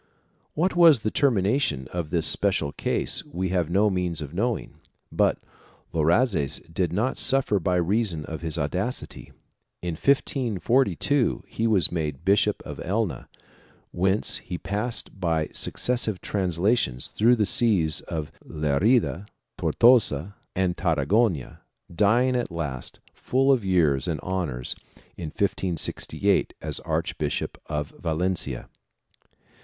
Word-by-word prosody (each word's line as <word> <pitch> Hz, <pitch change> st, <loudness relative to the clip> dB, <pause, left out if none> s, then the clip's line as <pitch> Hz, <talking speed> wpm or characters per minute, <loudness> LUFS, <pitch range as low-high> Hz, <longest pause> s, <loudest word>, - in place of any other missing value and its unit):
1 155 Hz, -, 0 dB
What 185 Hz, -, +1 dB
was 165 Hz, -6 st, +7 dB
the 110 Hz, -, -1 dB
termination 105 Hz, -, +1 dB
of 85 Hz, -3 st, -3 dB
this 85 Hz, -1 st, +2 dB
special 95 Hz, -8 st, +2 dB
case -, -, 0 dB
we 95 Hz, +2 st, -4 dB
have 90 Hz, -3 st, 0 dB
no 100 Hz, +5 st, +3 dB
means 90 Hz, -3 st, -2 dB
of 75 Hz, -1 st, -7 dB
knowing, 115 Hz, +5 st, -2 dB, 0.3 s
but -, -, +2 dB, 0.6 s
Loazes 85 Hz, -, +2 dB, 0.2 s
did 90 Hz, -2 st, 0 dB
not 110 Hz, +9 st, -1 dB
suffer 130 Hz, -6 st, +2 dB
by 90 Hz, +1 st, 0 dB
reason 90 Hz, -3 st, 0 dB
of 80 Hz, -1 st, -7 dB
his 80 Hz, -2 st, -2 dB
audacity. 90 Hz, -, -4 dB, 0.5 s
In 90 Hz, -, -2 dB
1542 130 Hz, -, +1 dB
he 115 Hz, -, -1 dB
was 105 Hz, -6 st, +3 dB
made 80 Hz, -2 st, -3 dB
Bishop 105 Hz, +1 st, +2 dB
of -, -, -7 dB
Elna, 100 Hz, 0 st, -2 dB, 0.6 s
whence 95 Hz, +3 st, +1 dB
he 90 Hz, -, -6 dB
passed 105 Hz, +1 st, -3 dB
by 80 Hz, -4 st, 0 dB
successive 120 Hz, -6 st, -1 dB
translations 90 Hz, -, 0 dB
through 120 Hz, +3 st, +3 dB
the 110 Hz, -3 st, +1 dB
sees 95 Hz, -10 st, +2 dB
of 80 Hz, -1 st, -4 dB
Lerida, 85 Hz, -, +1 dB, 0.3 s
Tortosa 100 Hz, -, +3 dB, 0.2 s
and 95 Hz, -2 st, 0 dB
Tarragona, 85 Hz, -, 0 dB, 0.3 s
dying 115 Hz, +8 st, +3 dB
at 125 Hz, -, -1 dB
last, 75 Hz, -7 st, -5 dB, 0.2 s
full 135 Hz, +2 st, +1 dB
of 130 Hz, -5 st, +2 dB
years 80 Hz, -8 st, +2 dB
and -, -, -2 dB
honors 85 Hz, -10 st, -3 dB, 0.4 s
in 85 Hz, -, -6 dB
1568 90 Hz, 0 st, -1 dB
as -, -, -3 dB
Archbishop -, -, -3 dB
of 75 Hz, -1 st, -4 dB
Valencia. 80 Hz, -5 st, -2 dB
95 Hz, 125 wpm, -25 LUFS, 80-115 Hz, 0.6 s, was